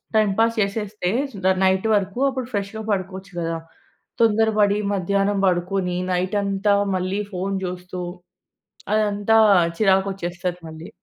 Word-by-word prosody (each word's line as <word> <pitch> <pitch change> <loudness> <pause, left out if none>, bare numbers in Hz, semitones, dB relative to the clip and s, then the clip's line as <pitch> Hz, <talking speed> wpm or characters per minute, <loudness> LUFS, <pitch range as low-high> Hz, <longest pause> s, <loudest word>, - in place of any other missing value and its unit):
Time 215 -2 +4
pass 230 0 +3
చేసేస్తే, 200 -2 -2 0.2
సు 210 - -10
the 190 - +5
night 190 +3 +2
వరుకు, 200 +3 -1
అప్పుడు 260 -3 -4
ఫ్రెష్‌గా 205 +2 -3
పడుకోచ్చు 190 0 -3
గదా! 165 -1 -2 0.6
తొందరపడీ 215 -2 +3
మధ్యానం 200 +1 0
పడుకొనీ, 180 0 0
నైటంతా 200 +2 +1 0.2
మళ్ళీ 185 +3 -2
ఫోన్ 195 +1 -2
చూస్తూ, 180 0 -6 0.9
అదంతా 215 +1 +2 0.4
చిరాకొచ్చేస్తది 190 -3 0
మళ్ళీ. 160 +1 -9
195 Hz, 115 wpm, -22 LUFS, 185-210 Hz, 0.9 s, the